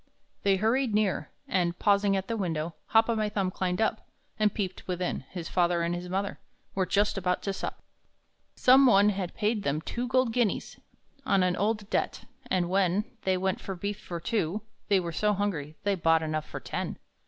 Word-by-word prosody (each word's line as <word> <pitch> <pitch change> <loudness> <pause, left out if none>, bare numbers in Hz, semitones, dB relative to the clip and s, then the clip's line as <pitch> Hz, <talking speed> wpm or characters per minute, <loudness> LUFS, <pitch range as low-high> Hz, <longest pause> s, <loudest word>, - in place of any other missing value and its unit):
They 195 -1 +3
hurried 225 +3 +1
near, 210 -3 +1 0.2
and, 175 -2 0
pausing 200 -1 +3
at 190 0 -3
the 230 - -1
window, 165 -5 -2
Hop 225 0 +4
o'my 220 -2 +1
Thumb 195 -3 -1
climbed 180 -1 -1
up, 220 - 0 0.3
And 210 -1 +4
peeped 190 -3 -4
within; 180 -1 -2
his 175 -3 -6
father 175 -1 +2
and 170 +1 0
his 175 +1 -5
mother 195 +2 -2 0.3
Were 190 -1 0
just 205 0 +2
about 180 -1 0
to 195 - -1
sup. - - -5 0.7
Some 265 +1 +6
one 205 -3 +6
had 190 -3 -3
paid 215 0 0
them 145 -3 0
two 240 +9 -4
gold 255 -2 +2
guineas 235 -5 0 0.4
On 195 -2 +3
an 180 -1 +2
old 210 +1 0
debt; - - -1 0.3
and 180 -2 +1
when 190 +2 +2 0.2
They 190 -1 +2
went 190 0 -1
for 195 - -5
beef 200 +3 -4
for 170 -1 -6
two, 205 0 -1 0.2
they 200 -2 +4
were 170 -2 -3
so 210 +5 +1
hungry 165 -7 -2
They 205 - +2
bought 165 -3 +3
enough 155 -1 -2
for - - -5
ten. - - -4
195 Hz, 190 wpm, -28 LUFS, 180-210 Hz, 0.7 s, Some